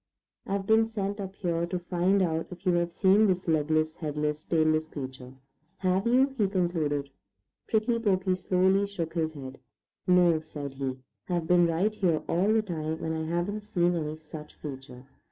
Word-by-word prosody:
"I've 195 Hz, 0 st, -1 dB
been 220 Hz, +2 st, +5 dB
sent 205 Hz, -2 st, -3 dB
up 190 Hz, -1 st, -6 dB
here 170 Hz, -3 st, -1 dB
to 180 Hz, +1 st, -2 dB
find 180 Hz, +2 st, +1 dB
out 165 Hz, -2 st, -1 dB
if 180 Hz, +2 st, -11 dB
you 180 Hz, -, +4 dB
have 175 Hz, 0 st, +1 dB
seen 200 Hz, +4 st, +4 dB
this 185 Hz, -1 st, 0 dB
legless, 155 Hz, 0 st, +1 dB
headless, 150 Hz, -1 st, -2 dB
tailess 155 Hz, -1 st, +2 dB
creature. 130 Hz, -3 st, -8 dB, 0.4 s
Have 190 Hz, +2 st, +1 dB
you?" 260 Hz, +3 st, +3 dB
he 205 Hz, -, +4 dB
concluded. 160 Hz, -7 st, -1 dB, 0.6 s
Prickly 230 Hz, +2 st, +1 dB
Porky 190 Hz, -4 st, +1 dB
slowly 190 Hz, +2 st, +2 dB
shook 170 Hz, -5 st, -4 dB
his 160 Hz, -2 st, -1 dB
head. 135 Hz, -2 st, -8 dB, 0.5 s
"No," 175 Hz, -3 st, +5 dB
said 145 Hz, -3 st, -7 dB
he. 135 Hz, -1 st, -3 dB, 0.3 s
"I've 175 Hz, -2 st, 0 dB
been 175 Hz, 0 st, +4 dB
right 175 Hz, +6 st, +1 dB
here 180 Hz, -7 st, +1 dB
all 190 Hz, +5 st, +2 dB
the 220 Hz, 0 st, +3 dB
time, 160 Hz, -4 st, -4 dB
and 160 Hz, -, -1 dB
I 160 Hz, 0 st, -2 dB
haven't 175 Hz, +5 st, -1 dB
seen 180 Hz, -5 st, +1 dB
any 155 Hz, -2 st, -2 dB
such 155 Hz, -1 st, -11 dB
creature." 135 Hz, -3 st, -8 dB
175 Hz, 170 wpm, -28 LUFS, 155-195 Hz, 0.6 s, been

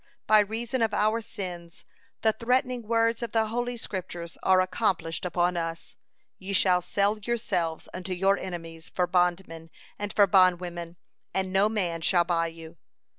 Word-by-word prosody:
By 215 Hz, 0 st, +6 dB
reason 230 Hz, +4 st, -1 dB
of 220 Hz, -2 st, +1 dB
our 215 Hz, +2 st, +2 dB
sins 180 Hz, -6 st, -7 dB, 0.4 s
the 220 Hz, -1 st, +3 dB
threatening 250 Hz, +2 st, 0 dB
words 230 Hz, 0 st, +2 dB
of 235 Hz, -2 st, -4 dB
the 225 Hz, -1 st, +3 dB
Holy 245 Hz, +1 st, -2 dB
Scriptures 175 Hz, -5 st, -6 dB
are 185 Hz, 0 st, +4 dB
accomplished 185 Hz, -3 st, 0 dB
upon 175 Hz, 0 st, +1 dB
us: 165 Hz, 0 st, -5 dB, 0.4 s
'Ye 195 Hz, +1 st, -5 dB
shall 185 Hz, -2 st, +3 dB
sell 200 Hz, +4 st, 0 dB
yourselves 195 Hz, -8 st, -2 dB
unto 185 Hz, +1 st, -6 dB
your 195 Hz, +2 st, +3 dB
enemies 165 Hz, -3 st, -7 dB
for 180 Hz, -, 0 dB
bondmen 175 Hz, -2 st, 0 dB, 0.3 s
and 205 Hz, 0 st, -3 dB
for 205 Hz, -, +5 dB
bondwomen, 175 Hz, -3 st, +2 dB, 0.4 s
and 190 Hz, -1 st, -1 dB
no 200 Hz, +2 st, +4 dB
man 180 Hz, -6 st, -1 dB
shall 175 Hz, +1 st, +3 dB
buy 170 Hz, -1 st, 0 dB
you.' 165 Hz, 0 st, -11 dB
185 Hz, 155 wpm, -27 LUFS, 175-215 Hz, 0.4 s, By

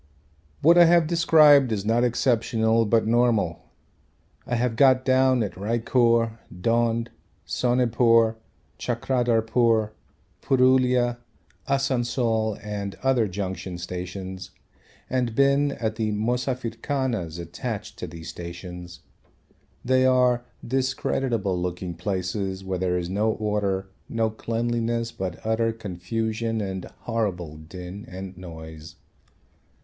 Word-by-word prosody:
What 170 Hz, +3 st, +7 dB
I 175 Hz, -, +9 dB
have 170 Hz, 0 st, +5 dB
described 155 Hz, -5 st, +5 dB
is 100 Hz, -2 st, -2 dB
not 115 Hz, +2 st, +2 dB
exceptional 115 Hz, -2 st, +2 dB
but 115 Hz, +1 st, +3 dB
normal. 115 Hz, -7 st, +2 dB, 0.9 s
I 120 Hz, -, 0 dB
have 120 Hz, -1 st, 0 dB
got 130 Hz, 0 st, +4 dB
down 130 Hz, -2 st, +3 dB
at 100 Hz, -, -4 dB
Raichur, 115 Hz, +2 st, +1 dB
Dhond, 115 Hz, +4 st, 0 dB, 0.4 s
Sonepur, 115 Hz, -2 st, +3 dB, 0.4 s
Chakradharpur, 115 Hz, -2 st, +1 dB, 0.5 s
Purulia, 125 Hz, -2 st, +3 dB, 0.5 s
Asansol 120 Hz, -5 st, 0 dB
and 100 Hz, -1 st, -4 dB
other 130 Hz, -5 st, +3 dB
junction 95 Hz, -1 st, -5 dB
stations 90 Hz, +1 st, -6 dB, 0.6 s
and 125 Hz, -3 st, -1 dB
been 140 Hz, +1 st, +3 dB
at 110 Hz, -3 st, -3 dB
the 110 Hz, -2 st, 0 dB
'Mosafirkhanas' 120 Hz, -, -2 dB
attached 100 Hz, +5 st, -6 dB
to 90 Hz, -, -4 dB
these 80 Hz, 0 st, -10 dB
stations. 90 Hz, -1 st, -8 dB, 0.8 s
They 130 Hz, +1 st, +3 dB
are 125 Hz, -1 st, +3 dB, 0.2 s
discreditable 125 Hz, -6 st, -1 dB
looking 90 Hz, 0 st, -3 dB
places 95 Hz, +1 st, -3 dB
where 95 Hz, -1 st, -3 dB
there 90 Hz, -1 st, 0 dB
is 85 Hz, -1 st, -3 dB
no 110 Hz, +3 st, +1 dB
order, 100 Hz, -3 st, -2 dB, 0.2 s
no 115 Hz, -1 st, 0 dB
cleanliness 115 Hz, +1 st, -2 dB
but 95 Hz, -5 st, -5 dB
utter 115 Hz, +1 st, +1 dB
confusion 110 Hz, +2 st, -3 dB
and 95 Hz, -3 st, -4 dB, 0.2 s
horrible 95 Hz, -9 st, -3 dB
din 90 Hz, +6 st, -9 dB
and 95 Hz, +1 st, -8 dB
noise. 80 Hz, -2 st, -10 dB
115 Hz, 105 wpm, -25 LUFS, 95-125 Hz, 0.9 s, I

